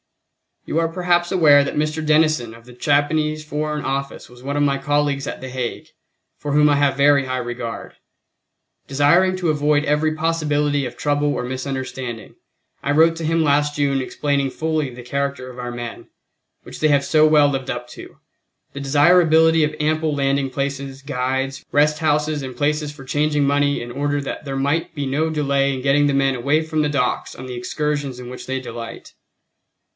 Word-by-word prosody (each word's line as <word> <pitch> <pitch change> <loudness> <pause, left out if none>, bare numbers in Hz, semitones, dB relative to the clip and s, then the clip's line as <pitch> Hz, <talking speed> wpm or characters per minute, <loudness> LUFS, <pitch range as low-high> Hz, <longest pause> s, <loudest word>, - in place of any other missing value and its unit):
You 160 - -1
are 165 - +1
perhaps 175 0 0
aware 150 -6 +6
that 140 - -4
Mr. 155 +1 -1
Denison 155 -7 +2
of 115 0 -17
the 125 - -13
Japanese 150 +3 +1
Foreign 150 0 -3
Office 140 +1 -4
was 125 0 -16
one 140 +2 -3
of 145 - +2
my 140 -1 +2
colleagues 145 0 0
at - - -6
The 130 - -6
Hague, 125 -2 -4 0.5
for 145 - -5
whom 150 0 +5
I 145 - +4
have 140 -1 +2
a - - -14
very 140 -1 +4
high 130 0 -2
regard. 120 -1 -5 0.9
Desiring 170 +7 +3
to 180 -3 -1
avoid 150 0 +2
every 150 +1 +1
possibility 150 -3 0
of 125 - -7
trouble 145 0 0
or - - -3
misunderstanding, 130 -2 -5 0.5
I 140 - -1
wrote 165 +3 +4
to 165 - -4
him 165 +1 +2
last 145 0 +2
June 140 -2 +1
explaining 140 +1 -1
fully 155 -1 -2
the 125 0 -10
character 140 0 -3
of 125 - -12
our 125 -1 -4
men, 120 -1 -7 0.6
which - - -10
they 155 - +3
have 140 -2 +2
so 155 -1 +4
well 150 -2 +5
lived 135 -2 -3
up 120 0 -4
to, - - -12 0.6
the 140 - -6
desirability 160 +2 +4
of 150 0 -1
ample 155 0 0
landing 140 -1 0
places, 135 0 -4
guides, 135 0 -2
rest 150 +1 +3
houses 150 -1 0
and 130 -2 -7
places 150 +1 0
for 145 -2 -12
changing 145 +2 0
money 145 0 +1
in 120 0 -7
order 145 +2 -1
that 140 - -6
there 135 -1 -4
might 145 +5 -1
be 145 -2 -3
no 150 +4 0
delay 140 -3 +1
in 130 - -4
getting 145 +2 +3
the 140 - +1
men 135 -1 +2
away 145 +6 +1
from 155 -1 -1
the 150 - +1
docks 140 -4 -1
on 130 - -9
the 125 -1 -6
excursions 145 +1 -3
in 125 -1 -8
which 125 - -8
they 130 0 -2
delight. 115 -2 -8
145 Hz, 190 wpm, -21 LUFS, 135-150 Hz, 0.9 s, aware